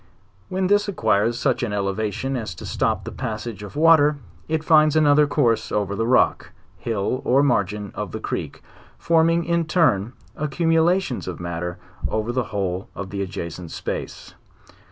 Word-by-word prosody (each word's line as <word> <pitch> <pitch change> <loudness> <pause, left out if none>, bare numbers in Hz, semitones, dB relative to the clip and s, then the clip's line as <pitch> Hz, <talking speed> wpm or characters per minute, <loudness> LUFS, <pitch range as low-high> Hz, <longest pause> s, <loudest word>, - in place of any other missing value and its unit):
When 185 0 -1
this 205 +2 +3
acquires 115 - +1
such - - 0
an 115 -4 -2
elevation 105 +6 -2
as 110 -9 -4
to - - -9
stop - - -1
the - - -6
passage 110 -1 -5
of 105 - -9
the 145 - -4
water, 155 -3 +6 0.3
it 160 0 -1
finds 155 -2 +5
another 150 -1 +5
course 115 -7 +1
over 100 -1 -1
the 115 +2 -1
rock, 130 - +2 0.2
hill, 115 +2 -2
or 135 +3 +3
margin 105 -6 0
of - - -5
the - - -5
creek, - - -5 0.3
forming 165 0 +2
ia 170 0 +1
turn, 135 - +2 0.2
accumulations 165 - +1
of 90 - -5
matter 85 0 -4 0.3
over 110 +2 -2
the 125 -1 -1
whole 95 -3 -3
of 95 -1 -6
the 100 -1 -3
adjacent 90 -2 -5
space. - - -6
120 Hz, 160 wpm, -22 LUFS, 100-155 Hz, 0.3 s, water